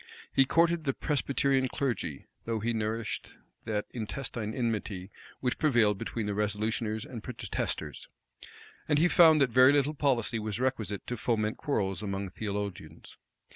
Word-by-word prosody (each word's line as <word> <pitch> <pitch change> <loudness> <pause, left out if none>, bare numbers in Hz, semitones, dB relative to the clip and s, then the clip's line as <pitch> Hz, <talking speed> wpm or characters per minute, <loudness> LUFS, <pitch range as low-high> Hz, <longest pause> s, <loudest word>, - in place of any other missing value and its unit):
He 135 - +5
courted 165 +3 +2
the 135 - 0
Presbyterian 140 -2 +1
clergy 120 - -3 0.2
though 115 -1 -1
he 115 +2 -1
nourished 110 0 -3 0.3
that 105 -1 -1
intestine 115 0 -4
enmity 105 -5 -2 0.3
which 125 -1 -1
prevailed 115 -10 +3
between 115 -1 -3
the 105 - -1
resolutioners 110 +2 -1
and 120 -4 -7
protesters; 125 +1 -4 0.8
and 150 - +4
he 165 +4 +5
found 160 -3 +7
that 130 -3 +3
very 130 +3 +7
little 145 +1 +2
policy 125 -6 +1
was 105 0 -3
requisite 115 -6 -1
to 125 - -4
foment 110 -1 0
quarrels 100 - -1
among 100 -2 -3
theologians. 100 -6 -6
115 Hz, 140 wpm, -30 LUFS, 105-135 Hz, 0.8 s, found